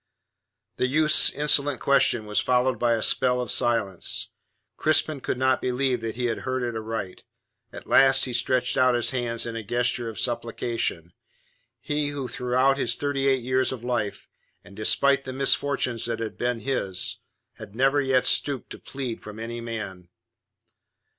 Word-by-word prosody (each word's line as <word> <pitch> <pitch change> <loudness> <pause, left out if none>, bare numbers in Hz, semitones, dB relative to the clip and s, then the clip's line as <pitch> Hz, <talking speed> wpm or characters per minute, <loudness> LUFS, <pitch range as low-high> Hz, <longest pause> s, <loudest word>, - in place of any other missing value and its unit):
The 125 - +1
youth's 155 +3 +5
insolent 145 -2 +1
question 135 -5 +2
was 105 0 0
followed 125 -1 +1
by 120 -1 +2
a 115 - 0
spell 125 -1 +2
of 125 - -3
silence. 110 -6 0 0.5
Crispin 155 -1 +1
could - - -3
not 130 0 +1
believe 125 -1 0
that 115 0 -4
he 125 +1 -2
had 115 -2 -1
heard 130 -1 -3
aright. 110 -4 -5 0.5
At - - -10
last 135 0 +5
he 125 - -5
stretched 125 +1 +1
out 130 -1 +4
his 120 - 0
hands 120 -3 -3
in 115 -1 -5
a 115 - -5
gesture 120 +1 0
of 110 - -8
supplication 115 -7 -2 0.7
he 150 0 -1
who 145 -3 -4
throughout 130 +3 +1
his 120 -2 0
thirty 140 -1 -1
eight 135 -2 +2
years 130 +1 +1
of 125 -3 -7
life, 120 -4 -3 0.4
and 100 - -15
despite 140 +6 +2
the 130 - -6
misfortunes 135 -3 0
that 115 -1 -2
had 115 -1 -5
been 120 -1 -2
his, 110 -9 -1 0.4
had 100 - -11
never 135 +3 +2
yet 130 -2 +1
stooped 140 -3 +1
to - - -8
plead 130 -4 -6
from 105 0 -10
any 115 +1 -6
man. 110 -6 -7
125 Hz, 165 wpm, -25 LUFS, 115-135 Hz, 0.7 s, youth's